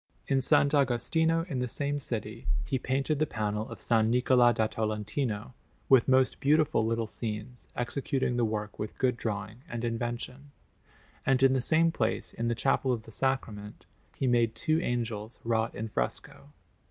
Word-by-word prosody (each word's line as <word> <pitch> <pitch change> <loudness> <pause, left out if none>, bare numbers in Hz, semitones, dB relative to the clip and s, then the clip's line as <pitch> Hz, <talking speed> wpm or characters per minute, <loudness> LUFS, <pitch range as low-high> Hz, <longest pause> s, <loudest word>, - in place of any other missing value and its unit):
In 135 - +2
S. 130 - 0
Agostino 145 +4 +3
in 140 -8 -3
the 125 - -1
same 145 +3 -1
city 115 -3 -4 0.2
he 130 - -1
painted 135 +4 0
the 155 - +2
panel 105 -1 -2
of - - -7
S. - - -9
Niccola 120 +2 +4
da 110 -1 +1
Tolentino, 110 +2 -2 0.4
with 130 -3 +6
most 130 -1 +3
beautiful 150 -4 +3
little 115 +1 0
scenes, 110 +2 -6
executing 130 0 -1
the 120 - +1
work 105 -1 -3
with 105 0 -5
good 130 -2 +2
drawing 110 0 -4
and 120 0 -4
invention; 120 +4 -4 0.7
and 135 0 +2
in 135 -1 +6
the 130 - +1
same 165 +5 +3
place, 110 -8 -1
in 115 - -2
the 120 - +1
Chapel 135 +1 +1
of 115 -3 -2
the 115 - -13
Sacrament, 110 -5 -3 0.3
he - - -2
made 120 -3 +2
two 155 +6 +1
angels 115 -4 -3
wrought 115 -1 0
in 110 +2 -3
fresco. 70 - -4
120 Hz, 165 wpm, -29 LUFS, 110-135 Hz, 0.7 s, with